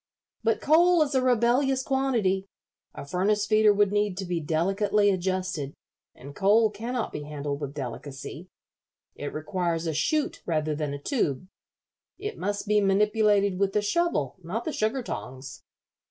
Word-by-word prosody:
"But 225 Hz, 0 st, +1 dB
coal 340 Hz, +2 st, +5 dB
is 285 Hz, -1 st, -4 dB
a 260 Hz, -, +3 dB
rebellious 255 Hz, +2 st, +2 dB
quantity. 235 Hz, -9 st, 0 dB, 0.5 s
A -, -, -7 dB
furnace 205 Hz, +7 st, +1 dB
feeder 215 Hz, 0 st, +5 dB
would 205 Hz, -1 st, +3 dB
need 205 Hz, -2 st, 0 dB
to 195 Hz, -, -3 dB
be 175 Hz, -1 st, -1 dB
delicately 195 Hz, +6 st, +2 dB
adjusted, 185 Hz, -6 st, -2 dB, 0.4 s
and 140 Hz, +3 st, -11 dB
coal 210 Hz, +2 st, +4 dB
cannot 230 Hz, +3 st, -3 dB
be -, -, -5 dB
handled 145 Hz, -1 st, -5 dB
with 140 Hz, 0 st, -5 dB
delicacy. 140 Hz, +5 st, -7 dB, 0.6 s
It 145 Hz, -, -6 dB
requires 165 Hz, +1 st, -2 dB
a 160 Hz, -, -1 dB
chute 295 Hz, -, 0 dB
rather 155 Hz, -2 st, 0 dB
than 150 Hz, -1 st, -3 dB
a -, -, -7 dB
tube. 150 Hz, -, -1 dB, 0.7 s
It 415 Hz, +2 st, -6 dB
must 205 Hz, 0 st, -2 dB
be 210 Hz, 0 st, +3 dB
manipulated 205 Hz, -1 st, +2 dB
with 195 Hz, -1 st, +1 dB
the 210 Hz, -, +1 dB
shovel, 210 Hz, -, 0 dB
not 185 Hz, +7 st, -4 dB
the 315 Hz, -, -2 dB
sugar 220 Hz, +4 st, -1 dB
tongs." 130 Hz, -, -7 dB
200 Hz, 155 wpm, -27 LUFS, 155-225 Hz, 0.7 s, coal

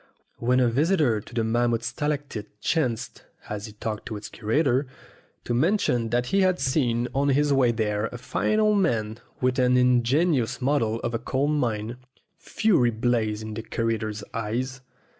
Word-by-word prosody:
When 125 Hz, +2 st, +2 dB
a 125 Hz, -, +4 dB
visitor 135 Hz, -, +2 dB
to 120 Hz, -, -15 dB
the 115 Hz, -, +1 dB
mammoth 120 Hz, +1 st, +1 dB
stalactite 140 Hz, -7 st, -4 dB
chanced, 125 Hz, -4 st, -1 dB, 0.3 s
as 105 Hz, +1 st, -4 dB
he 105 Hz, -, -11 dB
talked 105 Hz, 0 st, -5 dB
to 110 Hz, -, -4 dB
its 105 Hz, -, -8 dB
curator, 130 Hz, +4 st, +1 dB, 0.6 s
to 120 Hz, -, -2 dB
mention 125 Hz, -, +1 dB
that 120 Hz, +1 st, +1 dB
he 195 Hz, -, +4 dB
had 185 Hz, -1 st, +2 dB
seen 130 Hz, -3 st, +1 dB
on 140 Hz, +1 st, +1 dB
his 145 Hz, +1 st, +3 dB
way 130 Hz, -3 st, +4 dB
there 105 Hz, -1 st, -1 dB
a 120 Hz, -, -8 dB
fine 125 Hz, -, 0 dB
old 210 Hz, -1 st, +3 dB
man 115 Hz, -, 0 dB, 0.2 s
with 130 Hz, +1 st, +1 dB
an 125 Hz, 0 st, +4 dB
ingenious 125 Hz, +2 st, +2 dB
model 125 Hz, -5 st, +1 dB
of 120 Hz, -, -3 dB
a 115 Hz, -, -1 dB
coal 130 Hz, +4 st, -1 dB
mine, 120 Hz, -5 st, -1 dB, 0.4 s
fury 180 Hz, -, +2 dB
blazed 110 Hz, -2 st, 0 dB
in 110 Hz, 0 st, -6 dB
the 115 Hz, -, -4 dB
curator's 110 Hz, -2 st, -2 dB
eyes. 125 Hz, +4 st, -3 dB
120 Hz, 165 wpm, -25 LUFS, 115-140 Hz, 0.6 s, a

